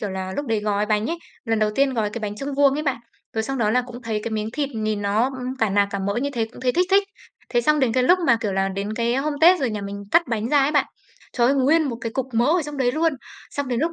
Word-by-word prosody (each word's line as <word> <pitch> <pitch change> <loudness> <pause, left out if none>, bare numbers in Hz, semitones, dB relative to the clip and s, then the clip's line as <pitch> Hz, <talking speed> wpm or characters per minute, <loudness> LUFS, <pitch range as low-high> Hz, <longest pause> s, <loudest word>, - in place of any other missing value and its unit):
kiểu 205 - -3
là, 190 0 -4
lúc 285 - -3
đấy 225 -2 0
gói 210 0 0
bánh 210 0 +1
ấy, 335 +3 -3 0.3
lần 225 -2 0
đầu 215 0 +2
tiên 275 +1 +2
gói 215 -3 0
cái 235 - -5
bánh 210 -1 -4
chưng 275 +4 -4
vuông 280 -1 +4
ấy 300 - -2
bạn, 275 -4 0 0.4
rồi 220 - -1
xong 270 +4 -3
đó 215 -3 +2
là 250 +3 +2
cũng 245 0 -10
thấy 220 -2 -2
cái 230 - -4
miếng 215 -1 -2
thịt 285 +1 -1
nhìn 215 -1 -2
nó, 205 +2 +1 0.2
ừm, 255 +1 -4
cả 220 -4 +1
nạc 200 +1 +2
cả 200 - -3
mỡ 200 +1 -2
như 285 - -1
thế 235 -4 0
cũng - - -12
thấy 250 -1 +1
thích 360 +5 +2
thích. 395 +1 +5 0.5
Thế 240 - +2
xong 300 +5 +2
đến 255 -4 +2
cái 255 - +2
lúc 355 +9 +5
mà, 235 - +5
kiểu 210 -3 -2
là, 195 0 +1
đến 200 +2 -4
cái, 235 +1 0
a, 265 - +1
hôm 300 +2 -1
tết 350 +3 +6
rồi 260 -4 0
nhà 210 -1 -4
mình 200 0 -6
cắt 340 - +5
bánh 225 -1 -1
ra 295 +2 +4
ấy 275 - +2
bạn, 290 - +3 0.5
trời 240 -2 +2
ơi, 270 - +3
nguyên 290 +5 +4
một 265 -6 -3
cái 230 0 -4
cục 265 +1 -2
mỡ 235 +1 +3
ở 335 +3 +3
trong 295 0 -6
đấy 250 -2 +1
luôn. 325 +2 +1 0.4
Xong 285 -2 -3
đến 245 -1 -1
lúc, 330 +3 0
240 Hz, 320 wpm, -23 LUFS, 210-280 Hz, 0.5 s, tết